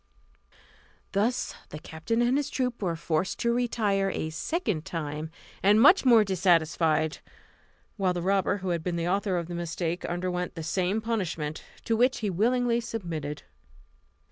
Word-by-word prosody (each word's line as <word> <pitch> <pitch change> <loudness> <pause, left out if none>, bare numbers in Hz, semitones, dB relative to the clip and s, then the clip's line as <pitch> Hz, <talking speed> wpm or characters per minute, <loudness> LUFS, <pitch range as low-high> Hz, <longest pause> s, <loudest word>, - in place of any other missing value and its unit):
Thus 225 +5 0 0.2
the 150 - -7
captain 160 +10 -2
and 245 +2 +2
his 290 0 0
troop 250 -4 -2
were 175 -4 0
forced 165 +2 -1
to 235 0 +2
retire 210 -5 +1
a 160 -4 -3
second 210 - -2
time, 155 -2 -4 0.3
and 205 +3 +5
much 290 - +7
more 235 -4 +7
dissatisfied; 165 -4 +2 0.8
while 190 -3 +2
the 175 -1 -3
robber 195 +1 +2
who - - -1
had 170 -2 0
been 175 0 -2
the 170 0 -1
author 195 0 0
of 170 - -2
the 175 - -6
mistake 170 0 -3
underwent 180 0 -2
the 165 - -5
same 185 +6 0
punishment, 180 -9 -3 0.2
to 230 - +1
which 250 +2 +2
he 210 -3 0
willingly 240 +5 +2
submitted. 165 -10 -5
185 Hz, 155 wpm, -27 LUFS, 165-225 Hz, 0.8 s, much